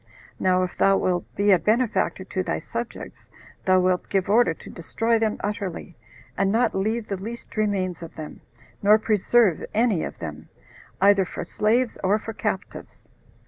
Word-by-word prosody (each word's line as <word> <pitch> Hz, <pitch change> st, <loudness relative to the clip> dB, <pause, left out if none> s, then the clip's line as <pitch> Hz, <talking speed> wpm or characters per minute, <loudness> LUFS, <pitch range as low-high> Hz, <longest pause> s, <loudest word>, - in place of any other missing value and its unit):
Now, 185 Hz, 0 st, +2 dB
if 180 Hz, -, -4 dB
thou 195 Hz, 0 st, +4 dB
wilt 180 Hz, -2 st, 0 dB
be 200 Hz, +1 st, +3 dB
a 185 Hz, -, +6 dB
benefactor 220 Hz, -2 st, +1 dB
to 190 Hz, 0 st, -3 dB
thy -, -, -2 dB
subjects, 235 Hz, 0 st, -7 dB, 0.4 s
thou 185 Hz, 0 st, +5 dB
wilt 180 Hz, 0 st, 0 dB
give 195 Hz, -1 st, 0 dB
order 230 Hz, -4 st, +5 dB
to -, -, -13 dB
destroy 225 Hz, +7 st, 0 dB
them 220 Hz, -1 st, 0 dB
utterly, 200 Hz, -5 st, -4 dB, 0.4 s
and 195 Hz, 0 st, +1 dB
not 230 Hz, +1 st, +2 dB
leave 215 Hz, +3 st, -1 dB
the 195 Hz, -, -3 dB
least 230 Hz, +5 st, -8 dB
remains 195 Hz, -5 st, -1 dB
of 165 Hz, -, -9 dB
them, 155 Hz, -1 st, -8 dB, 0.4 s
nor 210 Hz, +1 st, +6 dB
preserve 215 Hz, -2 st, +2 dB
any 220 Hz, -6 st, +2 dB
of -, -, -6 dB
them, 75 Hz, -1 st, -8 dB, 0.5 s
either 200 Hz, 0 st, +5 dB
for 180 Hz, -, -6 dB
slaves 225 Hz, +7 st, 0 dB
or 195 Hz, +3 st, +3 dB
for 225 Hz, +1 st, -7 dB
captives." 210 Hz, -2 st, -5 dB
200 Hz, 165 wpm, -24 LUFS, 185-220 Hz, 0.5 s, a